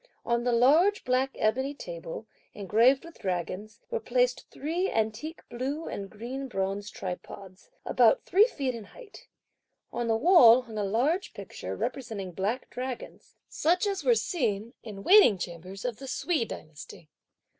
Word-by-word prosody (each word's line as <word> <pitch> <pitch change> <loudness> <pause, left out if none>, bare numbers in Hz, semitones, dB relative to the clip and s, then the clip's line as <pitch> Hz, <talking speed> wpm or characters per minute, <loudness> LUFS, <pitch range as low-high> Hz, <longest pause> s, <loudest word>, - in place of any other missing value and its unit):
On 235 0 +1
the 245 - +1
large 305 - +4
black 255 +1 +1
ebony 260 +6 0
table, 170 - -7 0.3
engraved 230 - +3
with 335 - -13
dragons, 190 +4 -4
were - - 0
placed 250 +2 0
three 335 +7 -2
antique 225 +9 -2
blue 275 +7 -4
and 195 -1 -5
green 250 +6 -6
bronze 195 -2 -3
tripods, 185 - -8 0.2
about - - +4
three 410 +5 +5
feet 275 - -3
in 230 -3 -8
height. - - -14 0.7
On 240 -1 -2
the 225 -1 +2
wall 255 -5 +7
hung 225 -3 -7
a - - 0
large 270 - 0
picture - - -7
representing 220 -8 -4
black 200 +8 -2
dragons, 255 0 -7
such 350 +5 +1
as 395 -2 -2
were 485 - +4
seen 235 - -1
in 205 -3 -9
waiting 385 - +7
chambers 185 +4 -7
of 245 -3 -2
the 270 - -9
Sui 305 -2 0
dynasty. 155 -3 -10
240 Hz, 150 wpm, -28 LUFS, 205-285 Hz, 0.7 s, wall